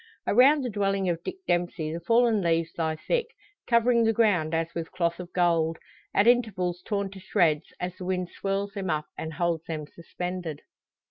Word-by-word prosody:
Around 270 +6 +5
the 250 - -2
dwelling 195 -2 0
of 170 -1 -2
Dick - - -4
Dempsey 175 -3 0
the 165 - -3
fallen 230 +3 +3
leaves 165 -1 +1
lie 160 -1 -1
thick, 470 - -1 0.4
covering 235 0 +4
the 225 0 +3
ground 200 -9 +2
as 165 0 -1
with 165 -1 -5
cloth 170 -2 -1
of 180 -1 -8
gold; 165 -2 +2 0.3
at 200 - +3
intervals 195 -8 +2
torn 200 -2 -2
to 195 - -10
shreds, 170 -6 +1
as 180 0 -4
the 180 - -7
wind 180 -1 -1
swirls 200 +1 -2
them 195 -2 -4
up 155 -1 0
and 160 0 -5
holds 170 0 -1
them 155 -2 -4
suspended. 170 0 -6
180 Hz, 185 wpm, -27 LUFS, 165-205 Hz, 0.4 s, Around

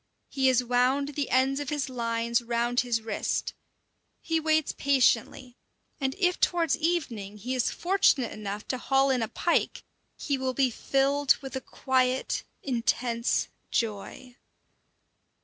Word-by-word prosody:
He 265 -1 +1
has 255 -1 +3
wound 250 +3 +1
the 290 -1 -3
ends 265 +2 +2
of 290 -2 -4
his 295 -2 -2
lines 235 -1 -1
round 240 +1 0
his 235 -3 0
wrist; 225 - -2 0.7
he 325 -1 -1
waits 315 -1 +1
patiently, 255 -1 +1 0.4
and 270 -1 -1
if 360 -2 +1
towards 340 -2 +2
evening 250 - -2
he 245 +5 -4
is 255 -3 +1
fortunate 345 -9 +2
enough 210 0 -6
to 255 - -2
haul 270 +1 +2
in 255 -2 +1
a 225 - -1
pike, 340 - 0 0.3
he 280 -3 -2
will 260 -1 -2
be 265 -1 +2
filled 275 +3 +2
with 270 -2 -8
a 265 - -3
quiet, 260 -1 0 0.2
intense 235 -2 0 0.2
joy. 230 +3 -3
260 Hz, 140 wpm, -27 LUFS, 235-280 Hz, 0.7 s, has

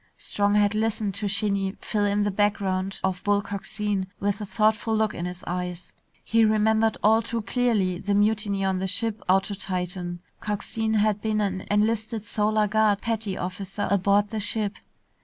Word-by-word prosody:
Strong 205 0 +1
had 205 0 +3
listened 215 -2 -1
to 205 +2 -2
Shinny 200 -1 0
fill 210 -2 -1
in 205 0 +1
the 205 - 0
background 195 -2 0
of 185 -1 -1
Bull 205 0 +3
Coxine 200 -1 -3
with 205 +1 -1
a 210 - -4
thoughtful 220 +1 +1
look 220 -1 +1
in 170 - -4
his 180 0 -6
eyes. 180 0 -4 0.3
He 225 0 +3
remembered 220 0 +3
all 220 +2 +5
too 230 0 -3
clearly 210 -6 +1
the 200 +1 0
mutiny 205 -1 +1
on 190 -1 0
the 190 - -1
ship 220 +3 0
out 190 +1 +5
to 200 +1 -5
Titan. 180 -2 -3 0.2
Coxine 220 +1 -2
had 210 -1 +2
been 215 -1 0
an 190 -2 -2
enlisted 220 +1 0
Solar 215 0 +1
Guard 210 -1 +3
petty 220 -4 -2
officer 190 +2 -4
aboard 200 +1 +3
the 220 - -3
ship. 210 0 -2
205 Hz, 175 wpm, -25 LUFS, 195-215 Hz, 0.3 s, all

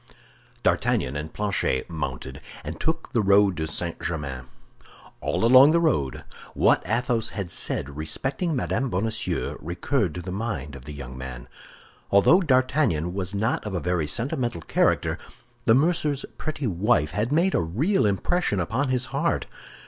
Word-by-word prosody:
D'Artagnan 65 - +1
and 75 +2 -4
Planchet 100 -10 -1
mounted, 65 -5 -5 0.2
and 80 +3 -6
took 160 -4 -2
the 115 - +3
road 100 -1 +4
to 80 0 -2
St. 85 +2 -3
Germain. 70 -7 -4 0.7
All - - 0
along 130 +5 +8
the 170 - +4
road, 75 - 0 0.3
what - - +4
Athos 115 0 +1
had 95 -4 -3
said 70 +1 0
respecting 135 - -2
Mme. 130 0 -1
Bonacieux 110 +2 -2
recurred 90 - -1
to 90 - -4
the 90 - -5
mind 90 - -4
of 65 -2 -11
the 75 - -7
young 65 -3 -8
man. 65 -2 -8 0.6
Although 130 - +5
D'Artagnan 130 - +2
was 95 0 -2
not 110 +4 0
of 105 -3 -4
a - - 0
very 85 -1 -1
sentimental 120 - -1
character, - - +1 0.5
the 115 - +6
mercer's 150 -1 +1
pretty 155 -2 -3
wife 95 -5 +1
had 105 +8 -1
made 170 +5 +3
a - - +2
real 115 - +1
impression 105 - 0
upon 115 - -1
his 130 0 +1
heart. - - 0
100 Hz, 155 wpm, -25 LUFS, 80-130 Hz, 0.7 s, along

